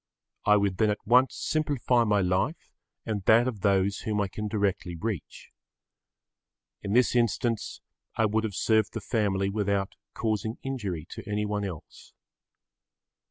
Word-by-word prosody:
I 105 0 +6
would 100 -2 0
then 110 +1 +3
at 105 - -3
once 125 +4 +4
simplify 140 -6 +1
my 105 -2 +2
life 95 - -1 0.3
and 105 -3 -3
that 115 +3 +5
of 115 -5 -3
those 100 0 +2
whom 105 -1 -2
I 100 -2 0
can 105 +3 -4
directly 100 -4 -1
reach. 105 -3 -5 1.3
In 100 - -3
this 125 +1 +3
instance 115 -1 0 0.3
I 110 - +2
would 110 +1 +1
have 105 -4 -3
served 110 0 +2
the 115 - -3
family 100 -3 0
without 100 -1 -1 0.2
causing 110 0 -2
injury 100 - -4
to 105 - -8
anyone 105 0 -1
else. 90 -6 -8
105 Hz, 145 wpm, -27 LUFS, 100-115 Hz, 1.3 s, I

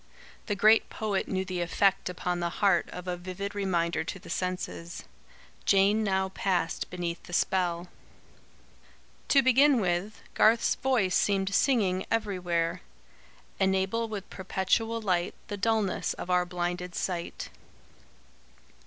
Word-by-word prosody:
the 205 - 0
great 215 +3 +5
poet 210 -3 -2
knew 190 -1 -1
the 185 -1 -3
effect 195 +2 +1
upon 180 0 -2
the 170 0 -1
heart 195 -4 +3
of 180 0 -8
a 180 - -1
vivid 185 +3 -6
reminder 170 -5 0
to 160 - -5
the 185 - -11
senses. 180 -2 -4 0.6
Jane 200 +2 +4
now 190 -2 0
passed 180 -3 -1
beneath 175 -1 -4
the 175 - -12
spell. 175 -1 0 1.4
To 275 -1 +5
begin 265 +1 +5
with, 190 +2 -2
Garth's 225 +1 +4
voice 235 -9 +1
seemed 195 -1 +1
singing 195 -8 +2
everywhere: 180 -6 -1 0.8
"Enable 190 +4 +1
with 205 -3 -6
perpetual 195 +5 0
light 180 -5 0
The 205 - -4
dulness 215 -2 0
of 180 - -5
our 180 0 +2
blinded 180 0 -3
sight." 175 -2 -4
190 Hz, 125 wpm, -28 LUFS, 180-205 Hz, 1.4 s, great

